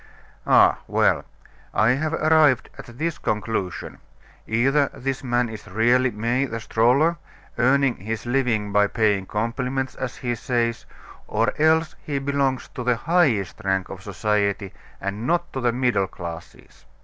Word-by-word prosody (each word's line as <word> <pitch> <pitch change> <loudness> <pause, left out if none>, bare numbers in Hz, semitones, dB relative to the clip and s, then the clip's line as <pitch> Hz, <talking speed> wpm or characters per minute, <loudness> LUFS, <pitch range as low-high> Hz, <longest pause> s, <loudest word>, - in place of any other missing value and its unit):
"Ah, - - +5
well! - - +2 0.5
I 110 +2 +4
have 155 +5 -1
arrived 155 -4 +3
at 120 0 -12
this 165 +2 -2
conclusion 105 -4 -3 0.5
either 135 +6 +2
this 135 +1 -3
man 120 -1 +1
is 110 -1 -9
really 120 +6 +3
May, 120 +5 0
the 115 -3 -5
stroller, 125 +10 +2 0.4
earning 130 +1 +3
his 110 +4 -5
living 120 -5 0
by 105 0 +4
paying 100 -3 +1
compliments, 125 +4 -2
as 130 -2 -5
he 120 -1 -3
says 115 0 -1 0.4
or - - +1
else 160 0 +3
he 145 -2 -3
belongs 135 -1 -1
to 125 - -6
the 125 0 +2
highest 115 - +1
rank 95 -1 0
of 95 - -8
society, 100 0 -1 0.3
and 100 +5 -4
not 175 +1 0
to 130 - -3
the 120 -1 +2
middle 120 -5 +1
classes. 85 -3 -10
120 Hz, 145 wpm, -23 LUFS, 105-135 Hz, 0.5 s, Ah